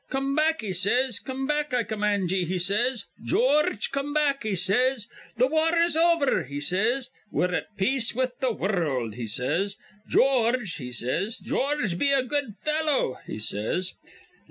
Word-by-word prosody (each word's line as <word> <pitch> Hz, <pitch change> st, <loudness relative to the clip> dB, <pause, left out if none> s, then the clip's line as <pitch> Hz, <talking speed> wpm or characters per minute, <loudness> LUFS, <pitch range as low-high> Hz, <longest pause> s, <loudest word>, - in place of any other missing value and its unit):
'Come 270 Hz, +1 st, -1 dB
back,' 315 Hz, 0 st, +2 dB
he 205 Hz, -4 st, -3 dB
says. 220 Hz, +5 st, +1 dB
'Come 265 Hz, 0 st, -4 dB
back, 295 Hz, -2 st, -1 dB
I 240 Hz, -, +2 dB
command 205 Hz, -4 st, -1 dB
ye,' 190 Hz, -1 st, +1 dB
he 185 Hz, +2 st, -2 dB
says. 210 Hz, +5 st, +1 dB, 0.2 s
'George, 255 Hz, -, +2 dB
come 275 Hz, +2 st, -3 dB
back,' 285 Hz, -2 st, +2 dB
he 215 Hz, -3 st, -1 dB
says. 215 Hz, +6 st, +2 dB, 0.3 s
'Th' 250 Hz, +3 st, +4 dB
war 320 Hz, +3 st, +2 dB
is 335 Hz, -1 st, +2 dB
over,' 330 Hz, -, +3 dB
he 140 Hz, +2 st, -5 dB
says. 225 Hz, -, 0 dB, 0.2 s
'We're 180 Hz, 0 st, 0 dB
at 205 Hz, +3 st, -4 dB
peace 235 Hz, +4 st, +1 dB
with 255 Hz, 0 st, 0 dB
th' 250 Hz, -4 st, 0 dB
wurruld,' 150 Hz, -, -1 dB
he 115 Hz, 0 st, -5 dB
says. 150 Hz, -, -1 dB, 0.3 s
'George,' 245 Hz, -6 st, +2 dB
he 125 Hz, -5 st, -7 dB
says, 130 Hz, -, 0 dB
'George, 255 Hz, -11 st, -1 dB
be 280 Hz, -, +3 dB
a 275 Hz, -2 st, +3 dB
good 265 Hz, -4 st, -2 dB
fellow,' 305 Hz, -, 0 dB
he -, -, -5 dB
says. 110 Hz, -, -2 dB
235 Hz, 165 wpm, -26 LUFS, 185-275 Hz, 0.3 s, Th